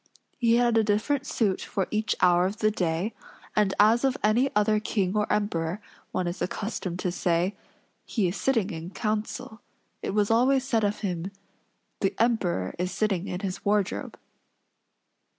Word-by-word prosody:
He 230 -1 +4
had 240 -1 +4
a - - +3
different 240 +7 0
suit 220 -11 0
for 195 - -2
each 215 0 0
hour 180 0 +5
of 200 +3 -5
the 215 0 +2
day; 180 +2 -1 0.4
and 210 -2 +3
as 220 +4 +5
of 270 0 +2
any 235 +6 +3
other 210 0 +3
king 200 -2 -1
or 210 0 +1
emperor, 180 -3 0 0.3
one 185 - -1
is 175 +1 -4
accustomed 185 -3 -3
to 180 - 0
say, 175 +2 0 0.5
"he 210 -6 0
is 175 - -2
sitting 225 -7 +1
in 165 +1 -6
council," 215 +2 -3 0.4
it 195 - -3
was 210 0 +2
always 255 +3 +4
said 230 -4 +1
of 205 0 0
him, 180 -3 -2 0.7
"The 195 - 0
Emperor 195 - +1
is 180 +1 -1
sitting 200 -4 0
in 180 - -4
his 190 -3 -4
wardrobe." 205 -1 0
210 Hz, 165 wpm, -27 LUFS, 185-225 Hz, 0.7 s, hour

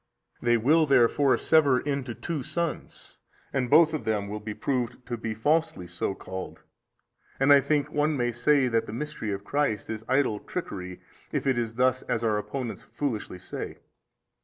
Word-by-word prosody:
A. - - -10
They 120 0 +4
will 155 +7 +4
therefore 135 +1 +4
sever 145 -5 +4
into 140 -4 -3
two 165 -5 -4
sons, 170 +4 -5 0.4
and 130 -3 0
both 160 +2 +6
of 155 - -2
them 105 -2 -1
will 105 +1 -4
be 105 0 -6
proved 125 -2 -2
to 120 - -3
be 115 -1 -4
falsely 150 - +1
so 85 +3 -3
called, 95 -1 -7 0.8
and 135 +2 +6
I 140 - +7
think 145 0 0
one 150 0 +1
may 120 -1 +1
say 135 +3 +3
that 115 -2 0
the 105 - -6
mystery 135 -4 -4
of 100 0 -4
Christ 140 -7 -1
is 110 0 -5
idle 130 -5 +2
trickery 90 - -6 0.3
if - - -2
it 135 -1 +3
is 115 -1 -2
thus 130 +1 +2
as 115 - -2
our 110 -2 +2
opponents 115 +3 -5
foolishly 120 -10 -4
say. - - -6
125 Hz, 180 wpm, -27 LUFS, 110-145 Hz, 0.8 s, I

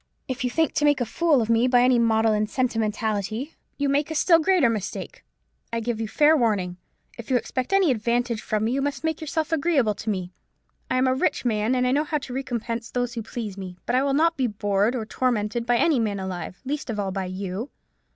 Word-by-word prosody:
If 260 0 -3
you 250 - +1
think 320 +5 +1
to - - 0
make 290 -2 +4
a 245 - 0
fool 295 +1 +2
of - - -4
me 230 +2 +3
by 245 -1 +4
any 250 -1 +4
maudlin 220 -2 +2
sentimentality, 220 +1 -1 0.2
you 285 - 0
make 285 +2 +1
a 315 - -4
still 335 +2 +5
greater 350 -4 +3
mistake. 215 -4 -4 0.5
I 230 - -1
give 230 -1 -2
you 220 - -2
fair 300 +7 +4
warning. 205 - 0 0.4
If 235 - -8
you 255 - +4
expect 255 +4 -3
any 390 -6 +4
advantage 235 0 0
from 215 0 -1
me, 225 - +1
you 275 +2 0
must 285 +2 -2
make 320 -1 -1
yourself 315 +1 -2
agreeable 285 -8 +2
to 220 - -6
me. 185 -3 -3 0.6
I 255 - +1
am 255 - +3
a 260 - +3
rich 260 - 0
man, 220 +1 +1
and 250 0 +2
know 295 +2 +2
how 305 0 -1
to 260 -3 -7
recompense 235 -3 -3
those 245 -1 -2
who 235 - -4
please 215 -3 -6
me: 180 -2 -7
but 240 - 0
I 255 - +4
will 275 0 +1
not 330 +2 +3
be 260 -2 +1
bored 205 +2 0
or 225 -3 -3
tormented 230 -1 -1
by 240 0 +3
any 310 -1 +3
man 210 -3 -1
alive: 185 -2 -6
least 290 0 -3
of 215 -2 -3
all 195 -2 -1
by 190 0 -3
you. 190 +6 -5
240 Hz, 230 wpm, -24 LUFS, 215-275 Hz, 0.6 s, still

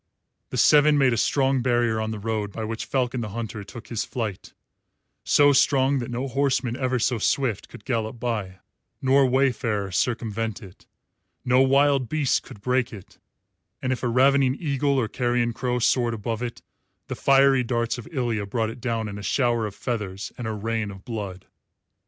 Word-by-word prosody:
The - - -4
seven 150 0 +5
made 135 -3 +4
a - - +1
strong 135 +3 +2
barrier 120 -3 +1
on 110 - -2
the 110 - -4
road 105 -1 -3
by 110 - -5
which 110 +1 -4
Falcon 125 -2 -1
the 110 - -4
Hunter 110 0 -5
took 115 +3 -11
his 115 -3 -2
flight, 110 -6 -5 0.7
so 145 0 +5
strong 135 0 +3
that 120 - -5
no 125 +3 -3
horseman 135 -2 0
ever 130 -1 0
so 120 0 0
swift 110 -3 0
could 105 - -13
gallop 115 -2 -2
by, 105 -6 -3 0.4
nor 135 0 +4
wayfarer 125 -6 0
circumvent 115 0 -2
it; 95 -1 -15 0.6
no 125 +1 +4
wild 135 -1 +3
beast 150 -4 +1
could 100 - -13
break 125 +2 0
it, 105 -5 -12 0.6
and 130 0 -1
if 125 - -5
a 125 - 0
ravening 130 +2 +3
eagle 140 -3 0
or 120 -4 +1
carrion 120 0 0
crow 125 +1 -1
soared 120 -1 +2
above 110 +1 -4
it 120 -1 -5 0.4
the - - -5
fiery 135 -1 +4
darts 120 0 -1
of 120 - -10
Ilya 120 -8 -1
brought 110 +1 -1
it 120 +1 -12
down 115 -3 -2
in 100 0 -6
a - - -7
shower 120 +3 +1
of 100 - -9
feathers 100 -5 -4
and 120 - -5
a - - -2
rain 110 0 -2
of 95 -1 -11
blood. 100 -6 -6
120 Hz, 180 wpm, -24 LUFS, 110-130 Hz, 0.7 s, seven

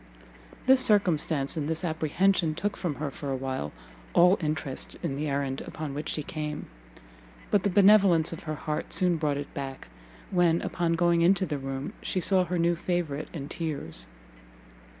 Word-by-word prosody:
This 260 0 +6
circumstance 160 - +2
and 155 -1 -2
this 160 +2 -2
apprehension 160 +1 +1
took 205 +4 -2
from 170 -6 -3
her 145 -1 -3
for 140 +1 -6
a 135 - 0
while 130 - -3 0.4
all 180 +2 +6
interest 150 -3 -3
in 135 - -1
the 150 +2 -2
errand 140 -1 -1
upon 155 -3 -5
which 150 +2 -4
she 150 - -2
came; 150 0 -4 0.9
but 205 - +4
the 200 - +1
benevolence 195 -4 +5
of 165 - -9
her 155 -1 -3
heart 150 0 -4
soon 180 -3 +2
brought 150 -3 0
it 145 - -6
back, 135 -1 -6 0.4
when, 175 -3 +3
upon 170 -1 0
going 170 0 +3
into 190 +3 +4
the 150 -5 -3
room, 135 +1 -5
she 185 - -1
saw 185 0 +3
her 180 +1 -2
new 170 0 +2
favourite 165 -4 -2
in 145 -5 -6
tears. 155 - -3
160 Hz, 170 wpm, -28 LUFS, 145-180 Hz, 0.9 s, This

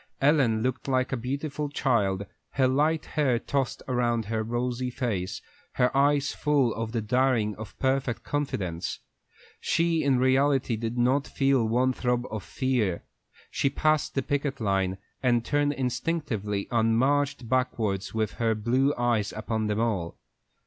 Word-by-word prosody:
Ellen 135 -7 +3
looked 130 +1 -2
like 130 -1 +1
a - - +1
beautiful 140 +4 -3
child, 100 -9 +1 0.3
her 130 -1 +3
light 150 +4 +1
hair 140 -6 +1
tossed 135 +1 -2
around 120 -3 0
her 110 +1 -1
rosy 120 +2 -2
face, 110 -5 -3 0.3
her 125 +1 +1
eyes 140 0 +3
full 140 -6 +2
of 115 0 -4
the 115 -2 -2
daring 115 -2 +1
of 110 0 -9
perfect 130 -2 0
confidence. 95 - -2 0.6
She 165 -1 +1
in 135 -2 +3
reality 130 -1 +2
did 115 +2 -4
not 130 +4 +2
feel 135 -4 +2
one 125 +3 +2
throb 125 -1 0
of 110 -2 -3
fear. 120 -10 -1 0.5
She 140 - +1
passed 155 +2 +1
the 135 - +1
picket 145 -1 -1
line, 95 -3 0 0.2
and 120 -3 +2
turned 145 0 +1
instinctively 125 -7 -2
and 115 -1 +2
marched 140 0 +1
backward 110 -6 0
with 110 -1 -1
her 115 -1 +2
blue 130 +6 +1
eyes 120 -4 +1
upon 110 0 -2
them 105 0 -1
all. 100 -8 -1
125 Hz, 150 wpm, -27 LUFS, 110-140 Hz, 0.6 s, Ellen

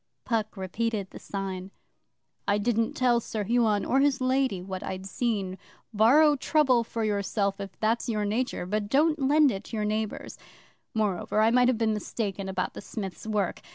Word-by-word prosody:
Puck 220 -3 -1
repeated 200 +1 -2
the - - -9
sign. 190 -1 -5 0.8
'I 200 - +3
didn't 225 +1 0
tell 245 -2 +3
Sir 215 -2 -4
Huon 220 -1 +2
or 265 - +2
his 280 -1 +3
Lady 255 -5 +1
what 185 +1 -6
I'd 190 0 -5
seen. 195 -3 -2 0.3
Borrow 285 +8 +5
trouble 265 -5 +3
for 230 0 -4
yourself 200 -1 0
if 195 -1 -8
that's 225 +2 0
your 210 -2 0
nature, 220 -2 -1
but 205 +2 -2
don't 305 +5 +3
lend 285 +1 +4
it 195 - -5
to - - -7
your 210 - 0
neighbours. 215 0 -3 0.6
Moreover, 210 -1 0
I 220 +1 +4
might 250 +1 +4
have 255 -2 +2
been 220 -1 +1
mistaken 200 -2 -3
about 185 -1 -2
the - - -8
Smith's 200 0 -6
work. 210 -4 -1
215 Hz, 175 wpm, -27 LUFS, 200-245 Hz, 0.8 s, Borrow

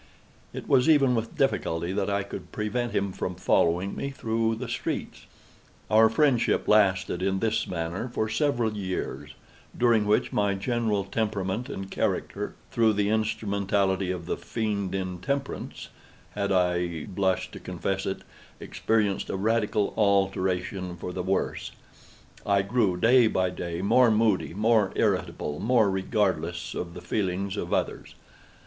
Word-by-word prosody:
It - - -7
was 130 +3 +4
even 140 -5 +5
with 115 -1 -3
difficulty 80 +2 0
that 100 0 -1
I 100 0 0
could 100 - -8
prevent 120 +3 -2
him 100 -1 0
from 90 0 -4
following 90 +1 +1
me 140 - -3
through 115 -4 -1
the 120 +2 -5
streets. 115 - -4 0.6
Our 110 +1 +6
friendship 130 -1 +2
lasted, 95 -4 +3
in 95 0 +1
this 110 +2 0
manner, 85 +7 -3
for 110 - -1
several 120 -3 0
years, 95 -3 -4 0.4
during 115 -4 +3
which 105 - +2
my 100 -1 +1
general 110 0 0
temperament 105 +3 -2
and 95 -7 -6
character—through 115 -2 -1
the 100 0 +1
instrumentality 100 -3 0
of 90 -2 -3
the - - -2
Fiend 100 -4 -2
Intemperance—had 100 +1 -5
(I 90 -3 +1
blush 95 -1 -1
to - - -9
confess 95 0 -3
it) 95 - -3 0.4
experienced 105 -3 0
a - - -2
radical 105 0 +1
alteration 95 -3 0
for 90 +2 -6
the 90 - -3
worse. 95 +2 -2 0.7
I 100 -1 +2
grew, 100 -3 +1
day 120 +4 +5
by 95 -4 +1
day, 85 0 -4
more 125 +4 +5
moody, 105 -5 +1
more 110 -2 +3
irritable, 75 0 -1
more 115 -3 +3
regardless 95 -4 -1
of 85 -1 -5
the 90 - -8
feelings 95 +1 -2
of - - -4
others. - - -2
100 Hz, 140 wpm, -27 LUFS, 95-110 Hz, 0.7 s, Our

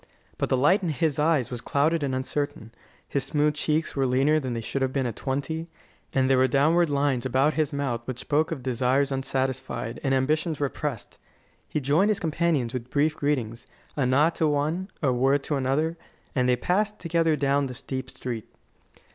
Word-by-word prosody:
But - - 0
the 130 - +2
light 150 +10 +4
in 175 - -1
his 150 0 0
eyes 150 -5 +2
was 120 -2 -4
clouded 155 +5 +1
and 135 -2 -1
uncertain; 135 -3 -3 0.4
his 140 - -1
smooth 150 +2 +1
cheeks 155 +2 -1
were 135 -1 +1
leaner 135 +5 +3
than 130 -4 -3
they 115 - -2
should 135 +4 -3
have 130 -1 +1
been 135 -1 0
at 120 -4 -3
twenty; 150 +5 -3 0.4
and 130 -1 +2
there 135 -1 +4
were 130 - +5
downward 155 +6 +3
lines 140 -3 +1
about 135 +4 +2
his 155 -1 0
mouth 135 -5 -2
which 130 -2 -4
spoke 155 +5 0
of 140 -6 -4
desires 130 +2 +1
unsatisfied 130 -3 -2
and 135 -1 +2
ambitions 155 +4 0
repressed. 145 -3 -4 0.5
He - - -1
joined 150 +9 +2
his 210 - +1
companions 155 -6 0
with 125 -1 -5
brief 150 +3 +1
greetings, 125 -7 -2 0.3
a 135 -4 +1
nod 145 +6 +3
to 160 - +4
one, 155 +6 0
a 130 -3 +3
word 135 +3 +2
to 150 - -1
another, 145 +5 0 0.4
and 125 -2 +1
they 125 - +4
passed 205 - 0
together 165 -1 +1
down 140 0 +1
the 125 - -7
steep 130 +1 -5
street. 120 -5 -6
140 Hz, 190 wpm, -26 LUFS, 130-155 Hz, 0.5 s, were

